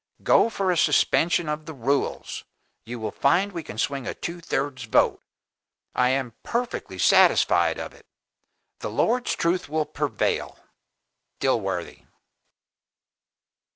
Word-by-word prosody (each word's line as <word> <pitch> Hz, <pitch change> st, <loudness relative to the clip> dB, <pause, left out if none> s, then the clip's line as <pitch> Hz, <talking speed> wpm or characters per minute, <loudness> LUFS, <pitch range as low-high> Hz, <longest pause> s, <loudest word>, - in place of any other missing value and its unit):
Go -, -, +4 dB
for 195 Hz, -4 st, 0 dB
a 175 Hz, -, 0 dB
suspension 170 Hz, +1 st, +3 dB
of 150 Hz, +1 st, -4 dB
the 160 Hz, -, -7 dB
rules! 135 Hz, +3 st, -2 dB, 0.4 s
You 120 Hz, +1 st, -5 dB
will 110 Hz, -1 st, -3 dB
find 190 Hz, -, +2 dB
we 170 Hz, -3 st, -5 dB
can 110 Hz, -, -10 dB
swing 135 Hz, +1 st, -2 dB
a -, -, -4 dB
two 170 Hz, +1 st, -6 dB
thirds 135 Hz, -4 st, -3 dB
vote 110 Hz, -, +2 dB, 0.7 s
I 125 Hz, 0 st, +2 dB
am 130 Hz, -3 st, -1 dB
perfectly 240 Hz, +1 st, -3 dB
satisfied -, -, +4 dB
of -, -, -6 dB
it. -, -, -20 dB, 0.7 s
The -, -, -4 dB
Lord's 245 Hz, +2 st, +1 dB
truth 170 Hz, -1 st, 0 dB
will 155 Hz, 0 st, 0 dB
prevail. -, -, -2 dB, 0.8 s
"DILWORTHY. 95 Hz, -9 st, -2 dB
150 Hz, 125 wpm, -25 LUFS, 125-175 Hz, 0.8 s, Go